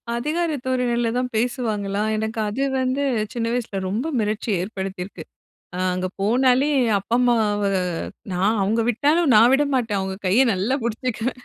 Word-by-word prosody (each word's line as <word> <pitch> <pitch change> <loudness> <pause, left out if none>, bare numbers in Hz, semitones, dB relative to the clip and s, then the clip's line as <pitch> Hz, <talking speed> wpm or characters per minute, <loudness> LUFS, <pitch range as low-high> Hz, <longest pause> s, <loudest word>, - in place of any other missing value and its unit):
அதிகார 315 +7 -1
தோரணையில 240 -2 0
தான் 250 0 -1
பேசுவாங்களா, 220 -4 -1
எனக்கு 220 +1 -3
அது 215 +6 -3 0.2
வந்து 260 +2 0 0.3
சின்ன 235 -1 -2
வயசுல 225 -5 -2
ரொம்ப 225 +9 -2
மிரட்சி 215 +1 -2
ஏற்படுத்தியிருக்கு. 190 -1 -6 0.5
அ - - -4 0.2
அங்க 185 0 -2
போனாலே, 255 +6 +3 0.3
அப்பா 230 +4 -2
அம்மாவ 220 -4 +2 0.7
நான் 200 +5 +1
அவுங்க 225 +4 +1
விட்டாலும் 290 +5 +2
நான் 230 +3 +7
விட 290 +2 +3
மாட்டேன் 225 -6 0
அவுங்க 190 0 -4
கைய 230 +9 +4
நல்லா 205 +8 0
புடிச்சுக்குவேன். 240 +2 -3
230 Hz, 140 wpm, -22 LUFS, 205-255 Hz, 0.7 s, நான்